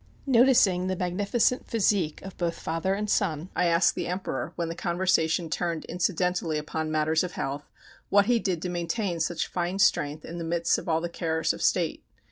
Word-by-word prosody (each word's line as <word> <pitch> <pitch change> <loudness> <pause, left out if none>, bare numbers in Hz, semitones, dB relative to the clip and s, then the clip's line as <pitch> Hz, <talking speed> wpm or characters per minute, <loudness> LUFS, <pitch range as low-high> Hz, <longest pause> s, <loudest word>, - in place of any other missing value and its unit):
Noticing 235 -8 +4
the 185 - -1
magnificent 200 +8 0
physique 195 -7 +1
of 195 - -8
both 170 -1 -2
father 165 +4 -1
and 210 +1 -3
son, 175 -5 0
I 180 - +2
asked 170 +1 +4
the - - -3
Emperor, 180 +2 -3
when 170 - -2
the 165 - -3
conversation 170 -1 +1
turned 165 0 -2
incidentally 180 -2 0
upon 155 +1 -3
matters 155 +1 +2
of 180 -2 -5
health, 140 +2 -4 0.4
what 200 0 +5
he 240 +1 +3
did 180 -6 -2
to 180 - -2
maintain 175 +1 -2
such 165 +1 -1
fine 180 +1 -2
strength 150 -6 +2
in 170 +1 -7
the - - -4
midst 170 +1 +1
of - - -7
all 160 0 +2
the 175 - -2
cares 160 -1 -1
of - - -9
State. - - +1
175 Hz, 190 wpm, -27 LUFS, 165-190 Hz, 0.4 s, what